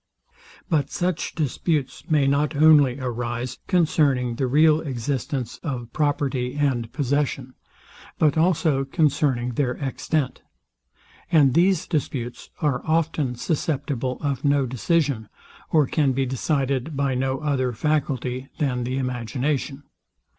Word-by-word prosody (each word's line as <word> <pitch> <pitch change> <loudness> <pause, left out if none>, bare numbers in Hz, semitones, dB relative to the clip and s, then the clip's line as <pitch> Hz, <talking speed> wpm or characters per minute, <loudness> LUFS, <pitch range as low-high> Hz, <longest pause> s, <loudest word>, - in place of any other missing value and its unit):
But 150 -6 +1
such 175 -1 -2
disputes 145 -1 -2
may 150 -3 +3
not 145 +3 +1
only 145 -3 +5
arise 120 0 -3
concerning 145 -8 +2
the 130 - 0
real 155 +4 +4
existence 130 -2 -3
of 125 -7 -5
property 140 -4 0
and 130 -6 0
possession, 140 -2 -1 0.6
but 150 -3 +3
also 160 -4 +2
concerning 135 -4 +1
their 125 0 0
extent; 140 +1 -2 0.9
and 145 -6 +5
these 185 +1 +3
disputes 130 -7 -3
are 140 -4 +1
often 155 -5 0
susceptible 135 -3 -2
of 140 -3 -2
no 140 -2 +3
decision, 130 - 0 0.4
or 155 -3 +4
can 140 0 +1
be 135 +1 0
decided 135 +2 -1
by 140 -1 +1
no 130 +1 0
other 135 -3 0
faculty 130 -1 -1
than 125 -4 -1
the 130 +2 -2
imagination. 130 +3 -2
140 Hz, 120 wpm, -24 LUFS, 125-150 Hz, 0.9 s, only